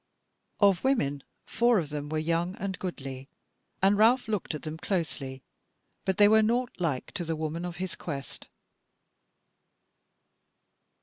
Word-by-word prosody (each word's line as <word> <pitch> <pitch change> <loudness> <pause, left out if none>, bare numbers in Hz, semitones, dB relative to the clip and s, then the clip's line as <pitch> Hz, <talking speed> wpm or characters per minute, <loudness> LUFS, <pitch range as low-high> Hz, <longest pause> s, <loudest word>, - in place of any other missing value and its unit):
Of 200 -4 +4
women 145 - +1 0.2
four 235 -1 +3
of 160 -6 -1
them 145 -1 -4
were 155 - -1
young 170 +3 0
and 190 -1 -4
goodly, 135 -7 -6 0.5
and 200 +1 +5
Ralph 240 +3 +5
looked 210 -7 -2
at 150 - -7
them 155 0 -5
closely; 145 -9 -3 0.6
but 190 -1 0
they 205 - +8
were 220 +1 +6
naught 240 +3 +1
like 155 -8 -1
to 180 - -3
the 165 -1 -2
woman 160 +2 -3
of 175 -1 -5
his 185 0 -4
quest. 140 -5 -6
175 Hz, 140 wpm, -29 LUFS, 155-205 Hz, 0.6 s, they